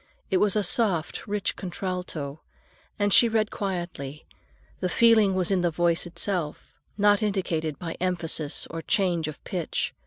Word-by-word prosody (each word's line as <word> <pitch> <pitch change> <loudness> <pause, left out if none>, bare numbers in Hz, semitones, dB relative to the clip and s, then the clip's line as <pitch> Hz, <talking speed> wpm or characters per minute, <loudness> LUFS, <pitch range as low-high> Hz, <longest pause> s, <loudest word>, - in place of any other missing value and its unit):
It 190 - +4
was 205 +1 +3
a 210 - +2
soft, 190 -2 0
rich 205 -1 -1
contralto, 180 -6 -5 0.6
and 205 -1 +2
she 235 - +7
read 220 -1 +1
quietly; 175 -7 -4 0.5
the 180 - -1
feeling 220 -2 +5
was 185 0 0
in 190 -2 +2
the 175 - +2
voice 170 +1 +1
itself, 170 -2 -3 0.2
not 205 0 +4
indicated 170 -7 -1
by 165 +1 -5
emphasis 165 -4 0
or 165 0 -4
change 175 -4 +1
of 155 - -8
pitch. 175 -5 -2
180 Hz, 150 wpm, -26 LUFS, 165-205 Hz, 0.6 s, she